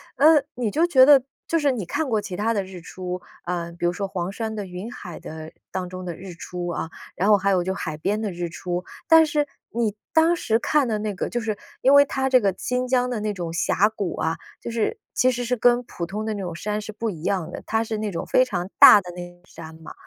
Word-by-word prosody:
呃， 305 +1 +6
你 235 -4 -1
就 330 +3 +3
觉 260 -6 +7
得 280 -2 +7 0.3
就 330 - +1
是 285 -2 +2
你 215 -8 -3
看 295 - -2
过 215 -2 +1
其 185 -3 -6
它 220 +4 0
的 200 -3 0
日 185 -1 -10
出， 180 +1 -6 0.2
呃， 170 -1 -3
比 175 0 -4
如 175 - +3
说 195 +2 -3
黄 185 -1 -3
山 220 +2 -4
的 205 -2 -4
云 185 +5 -7
海 175 -8 -9
的 160 0 -8 0.2
当 185 -1 -3
中 185 0 -7
的 175 -2 -5
日 180 0 -9
出 175 +1 -6
啊， 170 -1 -3 0.3
然 190 - 0
后 210 - +7
还 195 +1 0
有 185 -2 +2
就 190 +1 -1
海 155 -6 -4
边 210 +7 -1
的 210 - -2
日 175 -1 -4
出。 175 +1 -4 0.2
但 325 -1 +7
是 295 -1 0 0.2
你 225 -3 -1 0.2
当 325 +2 +5
时 225 -9 +1
看 295 -2 +2
的 215 -2 -1
那 210 -1 -2
个， 180 - -3
就 240 - -2
是 220 -2 -2 0.2
因 270 - +5
为 285 0 +8
它 265 -1 -1
这 255 -1 +6
个 200 -4 +1
新 250 0 -1
疆 250 0 +2
的 240 - -2
那 210 0 -2
种 175 -3 -5
峡 180 +4 +2
谷 205 -5 -4
啊， 160 0 -1 0.2
就 235 - -5
是 230 -2 -1 0.2
其 255 - +3
实 245 0 -3
是 245 +1 -1
跟 245 +1 +3
普 175 -7 -6
通 210 +5 -4
的 220 - -1
那 205 - -5
种 175 -3 -5
山 210 +4 -3
是 215 0 -7
不 225 +1 -3
一 165 -4 -7
样 180 -4 -1
的， - - -7
它 225 0 0
是 220 -1 -3
那 215 -1 -2
种 165 - -4
非 255 - +4
常 180 -5 -3
大 205 - +10
的 180 -2 -9
那 175 0 -7
个 175 - -26
山 160 -2 -11
嘛。 160 - -10
205 Hz, 280 characters per minute, -23 LUFS, 180-245 Hz, 0.3 s, 大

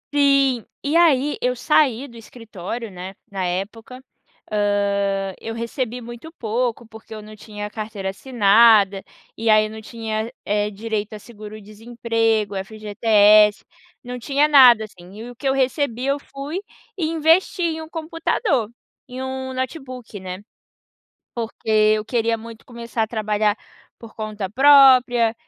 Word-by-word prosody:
Sim, 275 -4 +3 0.2
e 290 +3 -2
aí, 295 -4 +3
eu 250 0 +1
saí 270 0 +1
do 235 - -16
escritório, 225 -1 -8
né, 185 +1 -8 0.2
na 195 -2 -4
época, 220 +8 -5 0.5
hã, 200 -2 0
eu 225 - -5
recebi 235 +1 -4
muito 240 +7 -10
pouco 235 +1 -2
porque 220 0 -13
eu 215 - -8
num 215 +1 -12
tinha 210 0 -8
carteira 210 -3 -5
assinada, 210 -3 +4 0.3
e 225 0 -1
aí 215 0 +5
eu - - -6
num 220 0 -9
tinha, 220 0 -5
eh, 210 0 0
direito 210 0 -4
a 215 - -7
seguro 215 -1 -11
desemprego, 225 -1 -2
FGTS, 210 +1 +3 0.4
não 250 -1 -7
tinha 280 +4 +1
nada 250 -7 +7
assim. 180 -3 -16
E 235 +2 -8
o 245 - -12
que 275 - -12
eu - - +2
recebi 265 -2 -1
eu 275 +1 +1
fui 285 +8 -7 0.4
e 330 - -1
investi 330 +3 +2
em 320 -1 -1
um 315 - -10
computador, 325 - -1 0.4
em 255 +1 -7
um 260 0 -5
notebook, 255 - -6
né, 185 +1 -7 0.9
porque 230 -1 -7 0.3
eu 215 - -4
queria 230 0 0
muito 230 0 -12
começar 235 -1 -5
a 220 - -1
trabalhar 215 -1 0 0.4
por 230 -2 -13
conta 215 -3 -5
própria 255 -2 +5
230 Hz, 145 wpm, -21 LUFS, 210-260 Hz, 0.9 s, nada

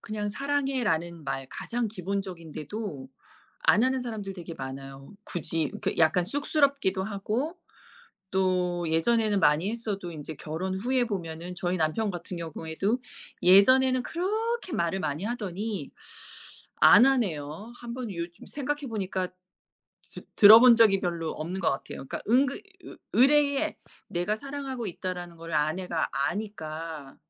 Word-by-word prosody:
그냥 210 -1 -4
"사랑해."라는 235 - -1
말 135 -1 -3
가장 240 -1 -3
기본적인데도 185 -4 -5 0.5
안 210 - +4
하는 260 +1 +2
사람들 220 -5 -5
되게 170 -2 -8
많아요. 135 0 -8
굳이 165 -2 -2
그 - - 0
약간 170 +2 +4
쑥스럽기도 280 - +1
하고 220 - -3 0.7
또 180 -2 +1
예전에는 210 +5 +2
많이 160 +4 +3
했어도 210 -6 -4
인제 155 -1 -7
결혼 170 +6 -4
후에 250 +4 +1
보면은 175 -4 -5
저희 180 +1 -1
남편 170 +7 0
같은 175 0 -6
경우에도 165 - -2 0.4
예전에는 255 +8 +6
그렇게 425 - -2
말을 170 +3 0
많이 150 +5 -2
하더니 205 - -4 0.9
안 235 +5 +8
하네요. 200 - -1
1 235 -1 -7
번 245 -3 -5
요즘 170 0 -6
생각해 290 0 -3
보니까 190 -5 -2 0.8
드 - - -9
들어본 230 +4 +10
적이 210 -4 +5
별로 170 -3 -2
없는 175 +5 -4
것 - - +2
같아요. 135 0 -5
그러니까 - - -5
은근 265 +4 +3 0.3
으 - - -10 0.2
으레에 280 +2 +4 0.3
내가 175 +5 -1
사랑하고 270 -1 -5
있다라는 175 -1 -5
것을 165 0 -9
아내가 160 +3 0
아니까 160 -3 -4
195 Hz, 300 characters per minute, -27 LUFS, 165-240 Hz, 0.9 s, 들어본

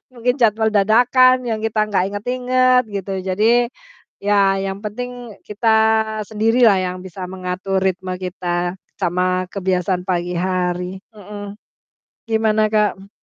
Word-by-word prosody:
mungkin 245 +1 0
jadwal 220 -1 +3
dadakan 245 +5 +4
yang 220 -1 -2
kita 220 -1 -2
gak 185 - +2
inget-inget 250 +4 +2
gitu. 195 0 -4 0.2
Jadi, 185 +3 0 0.8
ya 200 -1 +3
yang 195 0 -4
penting 245 0 -6
kita 210 +2 -2 0.6
sendiri 225 +3 +2
lah 200 - +4
yang 185 0 -3
bisa 185 +1 -7
mengatur 190 +1 -3
ritme 185 -1 -1
kita 180 -1 -3 0.2
sama 185 0 0
kebiasaan 185 -1 -1
pagi 175 -1 -1
hari. 180 0 -2 0.2
Mhm, 205 0 -9 0.7
gimana 220 -1 +2
Kak? 210 -1 +2
M 195 - -15
200 Hz, 125 wpm, -19 LUFS, 185-220 Hz, 0.8 s, dadakan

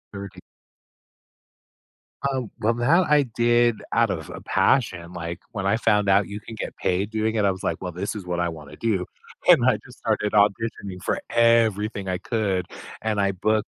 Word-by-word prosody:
Okay. 100 -2 -8 1.9
Um, 130 -5 -3
well, 115 +1 +2
now 145 +10 +3
I 150 -2 +4
did 120 -1 +2
out - - +3
of - - -4
a - - -7
passion, 90 -10 +1
like, 85 0 -5
when 100 -4 -4
I 100 - +3
found 105 -3 +2
out 100 +1 +4
you 100 +1 -6
can 110 +2 -10
get - - -5
paid 95 +3 0
doing 110 0 -1
it 105 - +1
I 100 - +4
was 95 - -7
like, - - -2
"Well, 90 - -4
this 95 +5 -4
is 100 - -6
what 90 -1 -2
I 85 - +1
wanna 80 -3 -10
do," 105 -6 0 0.4
and - - +7
I - - +4
just - - -14
started 105 - 0
auditioning 100 -2 0
for - - 0
everything 110 -4 +2
I 90 -1 -1
could 100 -6 -1 0.4
and 110 -2 -1
I 100 0 +2
booked 110 +3 0
105 Hz, 190 wpm, -24 LUFS, 95-115 Hz, 1.9 s, and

